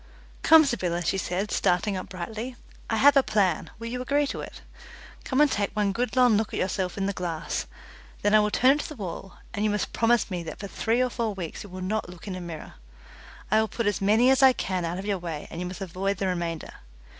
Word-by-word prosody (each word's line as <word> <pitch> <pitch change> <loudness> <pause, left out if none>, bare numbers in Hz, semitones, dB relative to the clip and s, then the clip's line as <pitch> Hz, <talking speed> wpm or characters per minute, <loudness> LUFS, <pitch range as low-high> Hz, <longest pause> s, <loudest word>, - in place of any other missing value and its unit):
"Come, 320 -1 +7
Sybylla," 180 -9 -1
she 190 +3 0
said, 190 +3 -2
starting 190 +3 +1
up 185 - -5
brightly, 220 +7 -5 0.3
"I 225 - +1
have 285 +5 +6
a 275 - +7
plan 205 -8 +1
will 230 - -8
you 250 +2 -3
agree 285 +3 +1
to - - -4
it? - - -9 0.6
Come 260 - -1
and 300 -2 +5
take 200 -1 0
one 205 -2 +1
good 240 +3 -2
long 250 -4 +5
look 220 0 -2
at - - -2
yourself 185 0 -1
in 195 - 0
the 200 - -1
glass, 170 -3 -3 0.6
then 205 - +3
I 215 - +8
will 210 0 +2
turn 255 +5 +4
it 290 - +2
to - - -4
the 305 - -8
wall, 195 -3 -7 0.2
and 205 - -2
you 215 - +2
must 210 0 -2
promise 230 -2 +2
me 180 -1 -2
that 165 -1 -7
for 205 - -7
three 225 +5 0
or 250 - -1
four 225 -4 -2
weeks 175 -4 -6
you 205 - -11
will 185 +1 -8
not 205 +1 -2
look 180 +2 -12
in 195 - -3
a 185 - -6
mirror. 170 -3 -8 0.8
I 215 - +5
will 220 - +2
put 230 +1 -3
as 205 -1 0
many 220 +6 +5
as 265 - +3
I 265 -1 +8
can 185 -6 -2
out 170 +2 -3
of 190 - -5
your 200 -2 -1
way, 165 -4 -5
and 170 - -5
you 180 - -3
must 180 0 -8
avoid 195 +2 -2
the 195 - -2
remainder. 170 -3 -3
205 Hz, 250 wpm, -26 LUFS, 180-230 Hz, 0.8 s, I